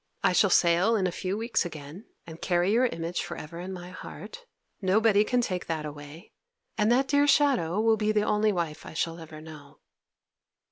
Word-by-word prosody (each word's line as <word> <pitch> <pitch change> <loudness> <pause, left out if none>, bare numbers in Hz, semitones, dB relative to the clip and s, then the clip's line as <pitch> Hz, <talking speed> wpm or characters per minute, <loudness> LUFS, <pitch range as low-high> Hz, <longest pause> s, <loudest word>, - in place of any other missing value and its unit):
I 185 - +3
shall 200 +2 +4
sail 180 +6 +4
in 195 -4 +1
a 180 - 0
few 185 +3 -3
weeks 225 0 0
again, 160 +3 -9 0.2
and 165 -1 -11
carry 175 +1 +1
your 245 +4 +3
image 170 -4 -4
for 175 -3 -7
ever 165 +2 -8
in 185 +2 -6
my 180 -1 -8
heart; 485 - -10 0.3
nobody 205 +2 +3
can 245 +3 +1
take 185 -6 -3
that 160 -2 -3
away, 145 +4 -10 0.4
and 210 +1 +2
that 265 +3 +3
dear 285 +1 +3
shadow 255 - +3
will 220 0 +3
be 215 0 +1
the 210 -1 +2
only 210 0 +2
wife 170 -5 -3
I - - -10
shall 165 +1 -2
ever 160 -1 -10
know. 150 -2 -13
185 Hz, 195 wpm, -27 LUFS, 165-220 Hz, 0.4 s, shall